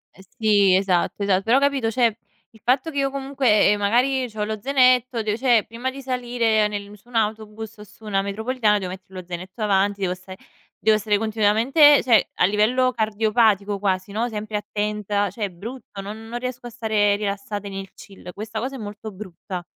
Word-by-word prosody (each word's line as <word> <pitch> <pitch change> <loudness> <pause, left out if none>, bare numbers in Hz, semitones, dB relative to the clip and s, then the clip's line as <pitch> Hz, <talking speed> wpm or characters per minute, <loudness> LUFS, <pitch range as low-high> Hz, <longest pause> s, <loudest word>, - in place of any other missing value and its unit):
Eh 190 - -15
sì, 205 -4 +4
esatto, 190 +1 +1
esatto. 195 -1 +2
Però 230 +5 +3
capito, 275 -5 +1
cioè 230 -2 +2 0.4
il 220 - -20
fatto 260 +6 +1
che 280 - -2
io 275 0 +1
comunque, 270 -6 +2
ehm, 205 - +1
magari 250 +4 +1
c'ho 210 -1 -3
lo 215 0 -3
zainetto, 255 -3 +3
di 210 0 0
cioè 240 -5 +3
prima 235 +3 -4
di 270 +1 -9
salire 240 -4 +1
nel 205 0 -6
su 240 - -29
un 245 - -13
autobus 220 0 -2
o 210 - -10
su 215 +1 -17
una 195 -2 0
metropolitana 215 +2 0
devo 185 -2 -4
mettere 190 0 -9
lo 180 - -10
zainetto 185 +5 -6
avanti, 200 0 +1
devo 180 -1 0
stare 185 +1 -11 0.4
devo 215 0 +3
stare 210 0 +1
continuamente 225 +8 +4
cioè 235 -4 +4
a - - +3
livello 235 +6 +2
cardiopatico 215 -2 +1
quasi, 190 0 -1
no, 225 +4 -1
sempre 210 -1 -4
attenta, 210 -1 -2
cioè 215 -4 -3
è - - -4
brutto, 210 +3 -9
non 215 +3 -8
non 240 +1 -5
riesco 250 -1 -5
a - - -7
stare 215 -3 +1
rilassata 205 0 -4
nel 195 -1 -7
chill. 190 -3 -12
Questa 220 +1 -5
cosa 260 +4 -4
è - - -6
molto 210 0 -7
brutta. 185 -2 -8
215 Hz, 195 wpm, -23 LUFS, 200-240 Hz, 0.4 s, sì